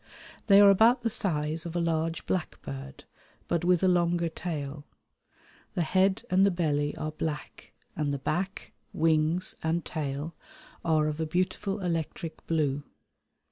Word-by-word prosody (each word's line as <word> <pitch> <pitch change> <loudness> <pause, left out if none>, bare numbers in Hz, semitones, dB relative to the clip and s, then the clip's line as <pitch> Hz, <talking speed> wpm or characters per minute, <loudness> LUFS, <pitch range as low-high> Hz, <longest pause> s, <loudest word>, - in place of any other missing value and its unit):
They 200 -2 +8
are 200 -1 +9
about 230 +5 +5
the 230 - 0
size 160 -7 0
of 170 - -7
a - - +1
large 165 -1 -1
blackbird, 70 - -4 0.4
but 170 -1 0
with 180 0 +3
a - - +5
longer 175 -1 +2
tail. 150 -4 -5 0.9
The 175 - +1
head 190 +3 +2
and 185 +1 +5
the 200 - +6
belly 150 -5 0
are 155 - -3
black 155 -1 -5 0.2
and 150 -2 -1
the 140 - -1
back, 180 +8 -3 0.2
wings, 160 +2 +2
and 165 +1 -1
tail 150 0 -4 0.5
are 155 -2 +3
of 155 0 -2
a 160 - -1
beautiful 185 +4 -1
electric 165 -2 -3
blue. 145 -4 +1
165 Hz, 145 wpm, -28 LUFS, 155-180 Hz, 0.9 s, are